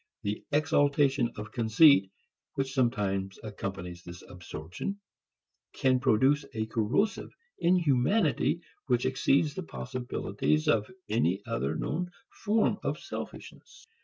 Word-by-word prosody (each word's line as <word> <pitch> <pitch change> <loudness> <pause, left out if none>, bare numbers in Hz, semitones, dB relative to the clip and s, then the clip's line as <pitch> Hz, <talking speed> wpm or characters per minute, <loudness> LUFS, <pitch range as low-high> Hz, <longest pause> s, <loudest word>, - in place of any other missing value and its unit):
The 105 +1 -3
exaltation 145 -4 +2
of 105 0 -7
conceit 115 -3 +5 0.5
which 135 -1 -2
sometimes 100 -7 0
accompanies 95 -4 -6
this 85 +1 -10
absorption 90 - -6 0.7
can 130 -1 +2
produce 135 +4 +3
a 110 0 -1
corrosive 120 - 0 0.3
inhumanity 170 - +2 0.3
which 125 -2 +2
exceeds 135 +3 +2
the 190 - -4
possibilities 125 - -2
of 105 -2 +2 0.2
any 100 -3 +1
other 115 -1 -2
known 175 +3 -2 0.3
form 215 +1 +2
of - - -1
selfishness. - - -9
125 Hz, 105 wpm, -29 LUFS, 105-145 Hz, 0.7 s, conceit